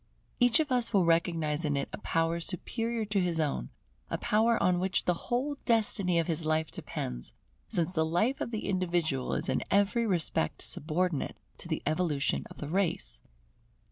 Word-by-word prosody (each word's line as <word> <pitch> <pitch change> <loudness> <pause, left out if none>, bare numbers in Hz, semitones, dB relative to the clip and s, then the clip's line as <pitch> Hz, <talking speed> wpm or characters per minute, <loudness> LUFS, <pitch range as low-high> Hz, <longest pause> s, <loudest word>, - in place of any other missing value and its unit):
Each 245 -2 +5
one 315 - +3
of 285 - -16
us 245 -2 +2
will 190 -4 +4
recognize 165 -2 +1
in 145 -2 0
it 140 - -1
a - - -5
power 165 +1 0
superior 225 +6 -2
to 205 -1 0
his 175 -2 0
own, 140 - -1 0.4
a - - -1
power 225 +2 +3
on 180 -1 +2
which 185 0 0
the 180 - +3 0.2
whole 275 +4 0
destiny 205 -6 +3
of 165 - +2
his 165 -1 -2
life 155 0 0
depends, - - -5 0.4
since 180 -4 0
the 160 - +2
life 175 +12 +1
of - - -1
the 220 -2 -4
individual 170 -8 0
is - - -2
in - - +1
every 205 +4 +3
respect 165 - 0
subordinate 165 +1 -1 0.2
to - - -9
the - - -2
evolution 155 -4 0
of - - -12
the 150 - -5
race. 170 - -1
175 Hz, 180 wpm, -30 LUFS, 160-210 Hz, 0.4 s, Each